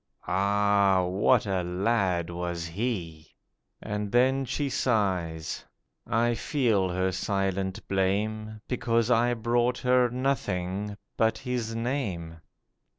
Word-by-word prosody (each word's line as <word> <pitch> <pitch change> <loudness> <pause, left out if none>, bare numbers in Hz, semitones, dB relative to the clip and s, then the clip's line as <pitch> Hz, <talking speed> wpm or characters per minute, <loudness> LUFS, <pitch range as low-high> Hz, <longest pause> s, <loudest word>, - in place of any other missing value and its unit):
Ah, 100 -1 +3
what 100 +6 +3
a 95 -2 0
lad 90 -1 0
was 85 -1 -3
he!' 85 -6 -4 0.5
And 105 -1 -3
then 130 +3 +3
she 140 +3 -2
sighs. 95 -11 -1 0.4
I 120 +1 +2
feel 115 - +1
her 95 +1 0
silent 95 +1 -2
blame, 105 +3 -1
Because 115 -1 +1
I 120 +1 +3
brought 120 +2 +1
her 125 -1 +3
nothing 105 -6 -2 0.2
but 110 0 +2
his 125 -4 -3
name. 110 -10 -3
105 Hz, 105 wpm, -27 LUFS, 95-120 Hz, 0.5 s, Ah